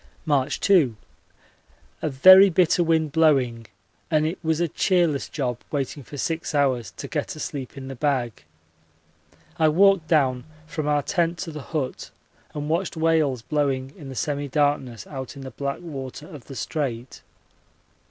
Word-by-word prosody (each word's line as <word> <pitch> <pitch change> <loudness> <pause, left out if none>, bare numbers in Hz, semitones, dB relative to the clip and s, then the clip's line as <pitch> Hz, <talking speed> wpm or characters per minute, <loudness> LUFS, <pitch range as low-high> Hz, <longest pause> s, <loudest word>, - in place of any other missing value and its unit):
March 145 -2 +1
2. 160 - +4 1.1
A - - -1
very 185 +8 +8
bitter 175 0 +3
wind 160 -2 +1
blowing 135 -8 +2 0.4
and 155 -1 +2
it 160 +4 -3
was 160 0 0
a 170 - +1
cheerless 170 -3 +1
job 125 -5 -3
waiting 140 0 -3
for 145 - -10
six 160 +2 -2
hours 130 -7 +1
to - - -8
get - - -3
a - - -10
sleep 135 -2 -6
in 130 -1 -7
the 135 - -6
bag. 130 -5 -1 1.2
I 160 - +5
walked 190 0 +4
down 130 -6 +2 0.2
from 155 -1 -4
our 145 -1 +2
tent 170 +1 0
to 165 - -7
the 150 -1 -7
hut 135 -2 -4 0.5
and 150 0 -4
watched 170 +2 -1
whales 160 -7 +1
blowing 135 -2 -1
in 145 -7 -10
the 130 - -8
semi 145 +1 -2
darkness 135 -6 0
out 130 -2 -7
in 140 - -9
the 130 - -7
black 140 -1 -4
water 140 -4 -7
of 150 -8 -11
the 135 - -10
Strait. 125 -2 -4
145 Hz, 160 wpm, -24 LUFS, 130-160 Hz, 1.2 s, very